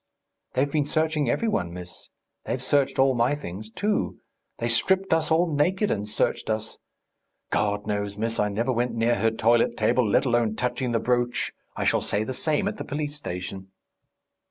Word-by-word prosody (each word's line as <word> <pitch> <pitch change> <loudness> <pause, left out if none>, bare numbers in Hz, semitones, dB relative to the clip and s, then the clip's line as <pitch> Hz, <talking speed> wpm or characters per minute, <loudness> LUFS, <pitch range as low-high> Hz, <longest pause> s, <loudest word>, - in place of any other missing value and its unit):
"They've 140 +2 +1
been 145 -1 +1
searching 155 -3 +1
every 230 - +1
one, 90 - 0
miss. 90 -1 -9 0.4
They've 130 - -2
searched 135 +1 +1
all 135 0 +4
my 120 +4 +2
things, 110 -6 -7
too. 205 - -1 0.4
They 115 - -1
stripped 190 +11 +2
us 160 -1 +1
all 165 0 +2
naked 185 +8 +2
and 105 0 -2
searched 105 - 0
us.... 110 0 -2 0.7
God 105 0 0
knows, 100 -1 -2
miss, 115 +1 -1
I 105 - +2
never 115 +6 0
went 120 0 0
near 115 +1 +2
her 115 - +3
toilet 115 +1 +2
table, 110 +1 +2
let 100 - +3
alone 120 -3 +2
touching 125 +1 -1
the 115 - +2
brooch. 120 0 0 0.2
I - - -2
shall - - +2
say 105 - 0
the 130 - -4
same 150 +3 0
at - - -3
the - - -4
police 145 0 -3
station." 95 -6 -6
120 Hz, 180 wpm, -26 LUFS, 110-145 Hz, 0.7 s, all